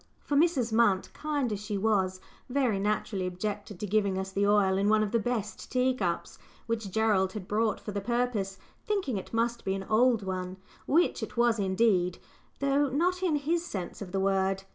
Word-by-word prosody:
For 290 - -2
Mrs. 280 -7 +2
Munt, 215 -5 +2
kind 290 -6 -1
as 205 - -3
she 210 0 -3
was, 190 -3 +1 0.3
very 250 -6 +1
naturally 200 -2 -1
objected 205 +1 -4
to - - -3
giving 200 -1 +1
us 190 0 -3
the 200 +1 +1
oil 205 -2 +4
in 200 +2 +2
one 215 0 +4
of 205 - -2
the 230 - +2
best 220 -2 -3
tea 255 0 +2
cups, 180 -8 -3 0.3
which 225 -3 -2
Gerald 195 -2 +2
had 205 -4 -6
brought 215 0 +1
for 210 - -6
the 200 0 -3
purpose, 235 -4 -1 0.3
thinking 375 - -1
it 190 - -7
must 235 +1 0
be 190 - -1
"an 195 - -4
old 230 0 +3
one," 185 -1 -4 0.3
which 335 +5 +2
it - - -6
was 235 -2 +3
indeed, 190 -2 +2 0.4
though 280 +1 +2
not 355 +7 +1
in 350 -5 +2
his 325 +4 0
sense 190 - -6
of 185 -3 -6
the 195 - -1
word. 195 0 +1
215 Hz, 195 wpm, -29 LUFS, 195-245 Hz, 0.4 s, oil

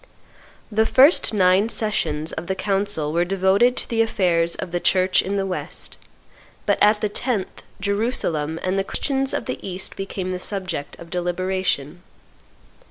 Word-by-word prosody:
The 220 +1 +2
first 280 +6 +5
nine 190 +1 +3
sessions 160 -9 -1
of 165 +2 -5
the 190 - -1
council 195 -6 -1
were 170 +1 +2
devoted 195 +7 +3
to - - 0
the 230 -1 +1
affairs 175 -6 +1
of 175 - -6
the 175 - -1
Church 185 +1 +3
in 200 +1 -2
the 195 - 0
West; 185 -1 -5 0.7
but - - +2
at 210 +1 +5
the 210 - +1
tenth 210 -1 -2 0.2
Jerusalem 195 -7 -1
and 185 +1 0
the - - +1
Christians 270 +5 -1
of - - -2
the - - -4
East 190 0 -3
became 195 -1 -4
the 180 - -3
subject 180 -7 -3
of 170 -1 -12
deliberation. 180 -3 -1
190 Hz, 160 wpm, -22 LUFS, 175-205 Hz, 0.7 s, first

